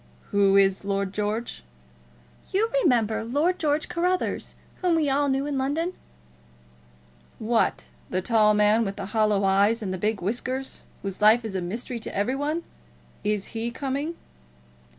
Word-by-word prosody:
"Who 200 -1 +4
is 195 -1 +3
Lord 195 -1 -1
George?" 210 - -3 0.9
"You 440 +4 +1
remember 225 - +2
Lord 295 +10 0
George 300 -1 +1
Carruthers, 360 +2 -1 0.2
whom 360 -2 +1
we 305 -4 +2
all 285 +1 +2
knew 270 +1 0
in 285 -2 -2
London?" 315 +7 -1 1.4
"What, 225 +1 0 0.2
the 185 - 0
tall 210 +1 +3
man 210 +2 +4
with 200 -2 -3
the 200 - -5
hollow 210 -2 +2
eyes 200 +4 +3
and 190 -2 -3
the 185 - -4
big 210 +2 0
whiskers, 255 +7 -2 0.2
whose 195 0 -5
life 220 +3 +5
is 215 - -4
a 185 - -1
mystery 230 +7 -4
to - - -7
every 205 +7 +1
one? 300 +4 -2 0.6
Is 210 -1 -1
he 225 +1 -2
coming?" 280 +6 -3
225 Hz, 150 wpm, -25 LUFS, 205-280 Hz, 1.4 s, life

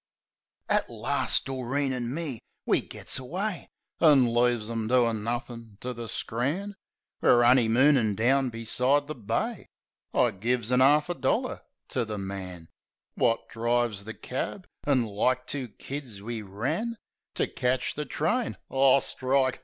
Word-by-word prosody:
At - - +1
last - - +1
Doreen 135 +1 -1
an' 120 -2 -3
me 145 -5 -4 0.3
we - - +3
gits - - -1
away. 180 +9 -3 0.3
An' 135 -7 +5
leaves 120 -2 +2
'em 115 -1 -3
doin' 115 -3 +2
nothin' 115 -2 -5
to 125 0 -3
the 120 -1 -6
scran. 150 - -2 0.5
(We're 120 - +5
honey 120 -1 +5
moonin' 120 -2 +4
down 130 +5 +2
beside 125 +5 +1
the 155 - -5
Bay.) 130 - -3 0.4
I 120 - +3
gives 115 +4 -1
a 125 0 +4
'arf 150 +4 +5
a - - +1
dollar 130 -4 -1 0.3
to 125 - 0
the 110 -2 -4
man 95 -4 -6 0.5
Wot 115 -1 +1
drives 115 -3 -1
the 110 - -7
cab; 180 +8 -4 0.2
an' 130 -5 +3
like 125 +5 0
two 135 -1 -3
kids 120 0 -7
we 115 +2 -5
ran 135 - -3 0.4
To - - +2
ketch 125 +1 -1
the 150 - -4
train 220 - -1
— - - -27
Ah, 135 0 +5
strike! 130 0 0
125 Hz, 150 wpm, -27 LUFS, 115-140 Hz, 0.5 s, An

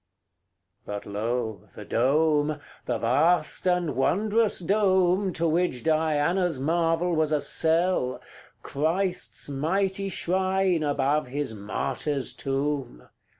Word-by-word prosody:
CLIII. 95 -1 -53
But 100 - -7
lo! 110 0 -3
the 105 - -9
dome 150 +5 +2 0.3
the - - -1
vast 155 +11 +1
and 180 -3 +1
wondrous 210 - +1
dome, 190 0 +2
To 165 +1 0
which 165 -6 0
Diana's 160 +1 +1
marvel 165 +3 +1
was 155 -1 +1
a 150 - +2
cell 165 -5 +1 0.4
Christ's 180 +5 -1
mighty 190 +8 -1
shrine 190 -1 +1
above 145 -1 0
his 140 -2 -3
martyr's 110 +7 -2
tomb! 135 - -3
155 Hz, 110 wpm, -26 LUFS, 130-180 Hz, 0.4 s, dome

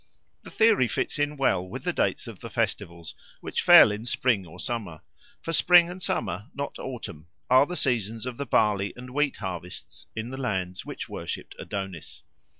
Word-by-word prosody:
The - - -11
theory 220 - +4
fits 145 - -2
in 145 0 0
well 95 -9 +2
with 90 - -8
the - - -1
dates - - 0
of - - -9
the - - -8
festivals, 85 -2 -3 0.3
which - - -2
fell 105 - +9
in 105 +3 -5
spring 115 -7 +1
or 85 +3 -13
summer; 100 -10 -4 0.4
for 165 - -3
spring 175 +1 +6
and 185 +1 -9
summer, 105 - -2
not 140 0 -5
autumn, 100 - -7 0.2
are 130 +3 +6
the 180 - -4
seasons 115 - -1
of 125 -2 -5
the 140 - -4
barley 100 -3 +2
and 125 +1 -10
wheat 145 +1 0
harvests 90 -2 -7
in 110 +2 -4
the 130 - -6
lands 95 -6 -3
which - - -6
worshipped - - -6
Adonis. 95 -5 -6
115 Hz, 180 wpm, -26 LUFS, 95-135 Hz, 0.4 s, fell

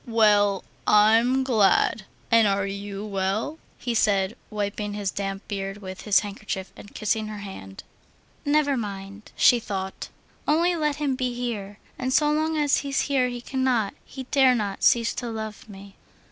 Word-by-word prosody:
"Well, 205 -4 +3 0.2
I'm 225 +5 +5
glad. 215 -4 +3 0.3
And 230 -2 +6
are 195 0 +1
you 200 +1 -5
well?" 200 +9 -2 0.2
he 245 - -3
said, 200 -2 +2
wiping 205 0 -3
his 200 -2 -2
damp 195 0 -4
beard 195 -1 -4
with 190 -2 -8
his 210 -2 +4
handkerchief 200 -2 -6
and 205 - -13
kissing 215 0 -1
her 215 0 -6
hand. 190 - -9 0.6
"Never 290 -1 +2
mind," 200 -2 -6
she 245 - +5
thought, 190 -3 -5 0.4
"only 340 +4 +3
let 300 -3 0
him 290 -2 -1
be 255 -2 -2
here, 210 -5 -4 0.2
and 255 0 -1
so 295 +2 +3
long 315 +1 0
as 290 -2 +3
he's 275 -1 -1
here 260 -3 +1
he 245 -1 -6
cannot, 250 -5 0
he 265 - -8
dare 265 -3 +5
not, 205 -4 -3
cease 230 -1 +4
to 240 - -4
love 220 -1 -6
me." 195 0 -12
215 Hz, 160 wpm, -25 LUFS, 200-255 Hz, 0.6 s, And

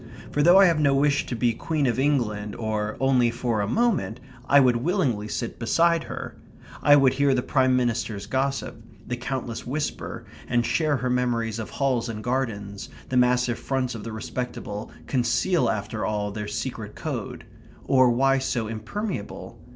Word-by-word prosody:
For 145 - +1
though 175 +5 +7
I 195 - +8
have 165 -4 +3
no 140 -2 +3
wish 140 +1 +2
to 125 - -3
be 120 0 +1
Queen 150 +5 -1
of 125 0 +1
England 110 -8 0
or 110 -1 -2
only 130 -3 +3
for 115 -2 -1
a 100 - -1
moment 195 - 0 0.3
I 140 - +7
would 125 -3 +4
willingly 125 - 0
sit 115 +2 -4
beside 165 +7 +2
her; - - -6 0.5
I 145 -1 +7
would 135 -3 +5
hear 140 0 +2
the 125 - 0
Prime 130 -2 +2
Minister's 115 -4 -1
gossip; 135 -2 -2 0.2
the 125 - -3
countess 120 -2 -4
whisper, 145 +4 -4 0.2
and 120 0 +1
share 150 +4 +1
her 125 0 -2
memories 115 -3 0
of 110 - -5
halls 130 -4 0
and 110 -1 -5
gardens; 105 -6 -3 0.2
the 130 - -2
massive 125 -1 +2
fronts 130 -2 -1
of 110 -3 -7
the 115 - -6
respectable 110 -1 -5 0.2
conceal 130 +3 +1
after 105 +1 -3
all 105 -1 -1
their 105 0 -5
secret - - -5
code; - - -5 0.4
or 130 -2 +5
why 135 +3 +3
so 125 -3 -1
impermeable? 110 - -5
125 Hz, 170 wpm, -25 LUFS, 115-135 Hz, 0.5 s, I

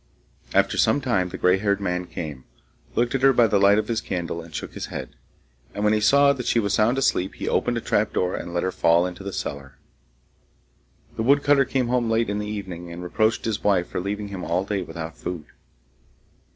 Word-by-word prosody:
After - - +2
some - - +3
time 115 -10 0
the - - -6
gray 90 +1 +3
haired 100 0 +1
man 90 -2 -2
came, 75 -8 -7 0.5
looked 120 +2 +1
at 135 - 0
her 135 0 +6
by 120 -2 +5
the 105 -2 +2
light 100 +1 +5
of 105 0 0
his 115 -1 -1
candle, 85 -4 -4
and 80 0 -13
shook 75 - -6
his - - -5
head. - - -6 0.6
And 105 - -2
when 105 0 +4
he 105 - +1
saw 140 +5 +5
that 125 -3 -6
she 120 - +3
was 100 -3 0
sound 110 +5 +3
asleep, 95 -8 0
he - - -5
opened 120 -1 +1
a - - -2
trapdoor 105 -5 0
and 85 - -5
let 85 0 -1
her 95 - 0
fall 85 0 +3
into 90 +1 -6
the 100 - -5
cellar. 70 -6 -6 1.4
The - - -1
woodcutter 140 +2 +4
came 125 -2 -1
home 120 -2 +1
late 115 -1 +1
in 105 - -2
the 105 - -4
evening, 95 -5 -6
and 85 +1 -7
reproached 110 +5 0
his 110 -2 -2
wife 95 -4 +2
for - - -3
leaving 100 +2 -4
him 95 -2 -6
all 90 +3 -1
day 100 -1 -2
without 80 -1 -7
food. 85 -4 -5
100 Hz, 215 wpm, -24 LUFS, 90-115 Hz, 1.4 s, her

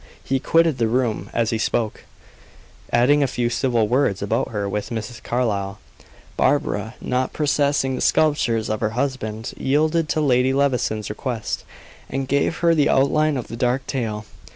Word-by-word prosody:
He 135 0 0
quitted 165 -1 +2
the 115 - +2
room 120 -1 -1
as 115 -1 0
he 110 - -1
spoke, 110 -1 -1 0.9
adding 130 +5 +4
a 140 - +3
few 120 -1 -1
civil 120 -4 +1
words 120 -5 +1
about 100 - 0
her 100 -2 -2
with 105 +1 -3
Mrs. 115 0 -5
Carlyle. 105 -5 -1 0.6
Barbara, 115 -6 0
not 125 0 -1
possessing 145 -2 +1
the - - -3
scruples 125 -8 +2
of 110 0 -2
her 105 - 0
husband, 115 -5 -3
yielded 155 +3 +1
to 155 - +1
Lady 130 -3 +3
Levison's 125 -6 0
request, 115 -1 -4 0.4
and 135 0 -3
gave 140 +5 +1
her 170 -1 +3
the 150 -3 +3
outline 150 +2 +3
of 125 - -4
the - - -7
dark 125 +2 0
tale. 110 -5 -3
125 Hz, 160 wpm, -22 LUFS, 110-140 Hz, 0.9 s, adding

